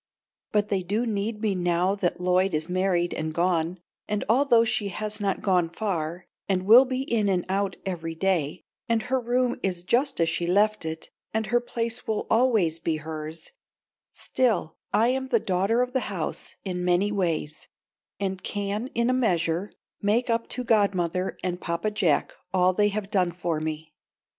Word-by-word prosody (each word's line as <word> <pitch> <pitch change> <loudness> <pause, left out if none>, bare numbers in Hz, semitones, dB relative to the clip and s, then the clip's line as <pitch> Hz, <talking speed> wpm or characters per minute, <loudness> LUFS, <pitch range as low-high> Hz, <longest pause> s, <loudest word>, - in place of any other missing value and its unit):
But 210 -1 +1
they 195 -2 +1
do 205 +7 -1
need 210 0 -2
me 210 -2 +2
now 175 +1 +1
that 185 -4 -1
Lloyd 180 0 +2
is 155 +1 -1
married 180 -1 +1
and 155 0 -3
gone, 170 +1 0 0.3
and 210 -1 -1
although 240 0 +5
she 220 -3 0
has 210 +2 -4
not 195 -2 -1
gone 180 -4 +2
far 175 -3 -3 0.2
and 185 -1 +1
will 235 +6 +8
be 260 0 -2
in 220 -6 +1
and 180 -2 +1
out 195 +1 0
every 165 -3 -4
day, 175 -3 0 0.3
and 225 -1 +2
her 260 +1 0
room 245 +1 0
is 180 -2 -2
just 250 +9 +1
as 165 - +3
she 165 +1 -1
left 210 +2 +2
it, 160 0 -5 0.2
and 220 0 +1
her 240 +2 +2
place 235 0 -4
will 220 - -1
always 220 -9 +3
be 165 -1 -1
hers, 155 - -6 0.6
still 225 -10 0 0.2
I 230 +2 +3
am 265 +1 -1
the 235 -3 +3
daughter 195 +6 +1
of 250 0 -5
the 260 - +2
house 180 -6 -4
in 180 -2 -3
many 180 +3 +2
ways, 165 -6 -2 0.5
and 190 -2 -2
can 205 +3 -3
in 235 0 +2
a 255 - +3
measure 180 -6 +1 0.3
make 230 +4 +2
up 230 0 0
to 250 - -2
godmother 190 -5 +1
and 180 -1 -2
Papa 170 +5 -1
Jack 180 -7 +1 0.2
all 185 0 +3
they 205 +2 +3
have 205 0 -4
done 185 -4 +2
for 170 -2 -2
me. 155 0 -5
195 Hz, 175 wpm, -26 LUFS, 175-225 Hz, 0.6 s, will